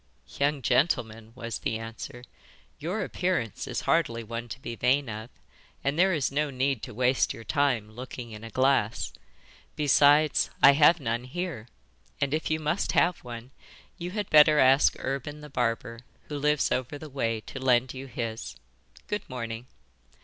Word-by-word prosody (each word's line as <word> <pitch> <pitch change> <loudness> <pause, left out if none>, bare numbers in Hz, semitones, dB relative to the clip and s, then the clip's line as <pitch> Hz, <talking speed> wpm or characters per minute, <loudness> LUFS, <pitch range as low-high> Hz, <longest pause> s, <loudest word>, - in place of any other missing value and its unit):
'Young 140 -1 +1
gentleman,' 115 -8 +1
was 115 -3 -5
the 110 - -2
answer, 115 +2 -8 0.6
'your 175 +8 -2
appearance 175 - -2
is - - -3
hardly 115 0 +1
one 115 +2 -6
to 125 - -7
be 120 -3 -6
vain 130 +3 +2
of, 110 +1 -6 0.5
and 140 - +1
there 190 +1 +5
is 150 -7 0
no 150 +1 0
need 135 -2 0
to 125 - -7
waste 125 +3 +1
your 115 - -10
time 125 -6 0
looking 120 0 -8
in 105 0 -9
a 115 - -7
glass. 130 -2 +1 0.6
Besides, 145 +1 +4
I 140 - +10
have 150 +4 +5
none 120 -2 -2
here, 140 -5 -5 0.5
and 140 0 0
if 155 - -1
you 155 0 +1
must 155 +5 -1
have 175 0 +3
one 120 +1 -8 0.5
you 175 +1 -4
had 205 +1 -3
better 150 0 +7
ask 135 +1 +5
Urban 140 +3 -4
the 150 -1 -11
barber, 115 -2 -1 0.3
who 145 -1 -4
lives 150 0 +2
over 130 +3 -1
the 155 - -9
way, 115 -5 -1
to 135 - -8
lend 125 -1 +2
you 135 +1 -7
his. 110 - -5 0.5
Good 210 - -4
morning. 115 -1 -5
130 Hz, 165 wpm, -27 LUFS, 115-150 Hz, 0.6 s, I